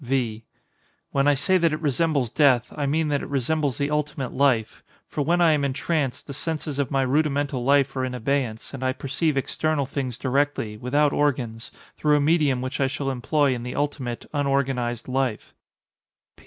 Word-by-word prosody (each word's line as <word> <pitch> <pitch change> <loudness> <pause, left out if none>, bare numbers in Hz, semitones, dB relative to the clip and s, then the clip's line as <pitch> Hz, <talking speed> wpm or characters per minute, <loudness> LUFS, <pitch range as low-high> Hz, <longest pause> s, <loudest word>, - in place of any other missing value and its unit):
V. 120 -4 -1 0.7
When 140 +1 +2
I 145 - +5
say 185 +7 +3
that 165 -2 +3
it 155 - -2
resembles 145 -4 0
death, 130 -6 +3
I 145 -2 -1
mean 155 +2 +1
that 145 -1 0
it - - -7
resembles 140 0 0
the 140 +1 -1
ultimate 150 -4 -2
life; 130 -5 +1 0.3
for 150 - -3
when 170 +4 +2
I 170 -2 +6
am 150 -2 +2
entranced 140 0 -1
the 140 - -7
senses 155 -1 -3
of 140 - 0
my 135 -1 +1
rudimental 140 -1 0
life 140 0 +3
are 130 - -1
in 130 -1 -3
abeyance, 125 -2 -2
and 135 -1 -5
I 130 0 +1
perceive 140 +3 -1
external 150 +1 0
things 130 -3 -4
directly, 135 -5 0
without 145 +6 +1
organs, 125 -6 -1 0.3
through 150 -1 +3
a - - +2
medium 145 -4 +2
which 130 +2 -3
I 135 - +3
shall 135 0 -2
employ 135 +3 +1
in 120 - -4
the 125 +1 -5
ultimate, 140 -5 -3
unorganized 135 -4 0
life. 130 -4 -2
140 Hz, 180 wpm, -24 LUFS, 130-145 Hz, 0.7 s, I